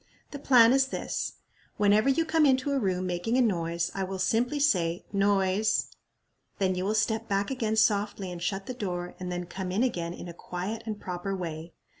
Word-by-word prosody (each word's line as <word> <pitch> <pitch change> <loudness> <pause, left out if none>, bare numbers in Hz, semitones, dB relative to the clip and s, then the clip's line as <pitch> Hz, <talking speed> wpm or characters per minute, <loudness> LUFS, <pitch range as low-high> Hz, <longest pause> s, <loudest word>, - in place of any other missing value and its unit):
"The 285 - -6
plan 245 -4 +6
is 270 0 +3
this: - - -3 0.4
whenever 210 +4 +4
you 320 +5 +2
come 320 -1 +2
into 265 0 +3
a 280 - +1
room 185 -4 -1
making 180 +7 -1
a - - +5
noise, 170 -5 0
I 195 - -2
will 190 0 -4
simply 240 +9 +1
say, 175 - +1
Noise. 200 +1 +2 0.7
Then 190 -1 +1
you 180 +1 -2
will 210 +2 0
step 220 +1 0
back 200 +3 0
again 225 -4 -1
softly 205 -3 +1
and 175 -1 -7
shut 195 +2 -2
the 255 - -5
door, 180 -7 -4
and 180 -1 -4
then 175 0 -3
come 180 +1 -5
in 205 +6 +1
again 175 -9 -2
in - - -8
a 170 - -7
quiet 180 +6 -5
and 215 -2 -4
proper 180 +2 -4
way. 165 -2 -6
200 Hz, 200 wpm, -28 LUFS, 180-230 Hz, 0.7 s, plan